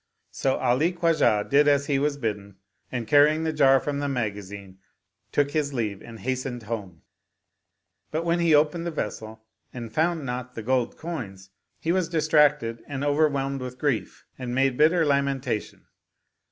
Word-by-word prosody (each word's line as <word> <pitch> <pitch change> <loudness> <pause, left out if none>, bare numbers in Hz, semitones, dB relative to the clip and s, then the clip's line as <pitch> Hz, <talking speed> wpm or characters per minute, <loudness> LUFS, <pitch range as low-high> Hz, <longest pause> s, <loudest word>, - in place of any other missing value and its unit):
'* - - -49
So 135 -1 0
Ali 130 +8 +1
Khwa 170 -2 +2
jah 110 -8 +3
did 145 +1 +4
as 140 -1 +3
he 140 -1 +1
was 145 0 0
bidden 105 -6 -4 0.4
and 120 -3 -3
carrying 150 +6 +4
the 160 -1 -1
jar 135 -3 +5
from 140 +1 -3
the 145 0 -2
magazine 100 -5 -5 0.5
took 145 -1 +1
his 145 -2 -1
leave 105 -5 -2
and 115 -3 -11
hastened 130 -1 -3
home; 105 -6 -6 1.1
but, 160 +2 -2
when 170 +1 +1
he 170 -2 +4
opened 155 +3 +2
the - - 0
vessel 110 -6 -5 0.3
and 115 -3 -8
found 160 +1 0
not 125 0 -5
the 115 - -6
gold 125 +1 0
coins, 100 - -7 0.3
he 165 - -1
was 180 -2 0
dis 160 -2 0
tracted 145 -7 +3
and 140 -1 -4
overwhelmed 140 -2 +1
with 125 0 -6
grief 135 -4 -2
and 125 -1 -4
made 135 -1 +2
bitter 160 +4 +4
lamen 140 -1 +1
tation. 125 -5 -4
135 Hz, 175 wpm, -25 LUFS, 115-150 Hz, 1.1 s, jar